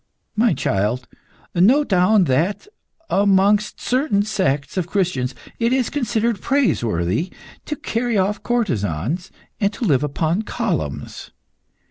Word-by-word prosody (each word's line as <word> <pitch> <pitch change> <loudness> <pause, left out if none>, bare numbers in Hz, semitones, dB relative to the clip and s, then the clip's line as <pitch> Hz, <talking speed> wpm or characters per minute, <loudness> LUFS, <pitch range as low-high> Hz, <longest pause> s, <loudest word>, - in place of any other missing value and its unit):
"My 225 +1 +3
child, 105 +6 -1 0.5
note 250 +12 +4
down 190 +2 +4
that, 170 - 0 0.4
amongst 200 +1 +3
certain 250 -6 +1
sects 145 -10 -1
of 180 -3 -1
Christians, 170 -10 -1 0.2
it 230 0 +2
is 255 -2 +1
considered 235 -6 0
praiseworthy 120 - 0 0.3
to 300 - -3
carry 235 -3 -1
off 200 +2 0
courtesans 165 - -1 0.3
and 200 0 0
live 145 - +3
upon 160 +6 0
columns. 190 - -3
195 Hz, 110 wpm, -21 LUFS, 140-225 Hz, 0.5 s, note